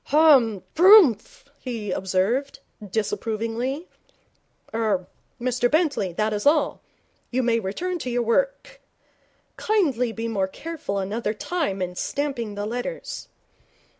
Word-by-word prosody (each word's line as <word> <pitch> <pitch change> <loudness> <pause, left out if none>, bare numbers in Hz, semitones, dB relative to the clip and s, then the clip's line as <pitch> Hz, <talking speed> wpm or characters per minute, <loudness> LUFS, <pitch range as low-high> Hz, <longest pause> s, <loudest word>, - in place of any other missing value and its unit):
'Ha! 305 -1 +7 0.3
Prrumph!' 345 - +6
he 225 -6 -5
observed, 195 +10 0 0.3
disapprovingly. 225 - -2 0.9
'Er 215 -5 0 0.3
Mr 245 0 +1
Bentley, 295 - +1
that 215 +4 0
is 210 +6 -1
all. 300 +1 +2 0.5
You 255 +1 0
may 230 -1 +2
return 340 - -3
to 255 - -4
your 245 0 0
work - - -1
ah'mmm! - - -41
Kindly 285 - +1
be 225 +1 -4
more 200 -4 0
careful 290 -2 -5
another 210 +3 -2
time 215 - -2
in 180 0 -4
stamping 245 -1 -3
the 205 0 -3
letters.' 245 - -5
235 Hz, 120 wpm, -24 LUFS, 210-295 Hz, 0.9 s, Ha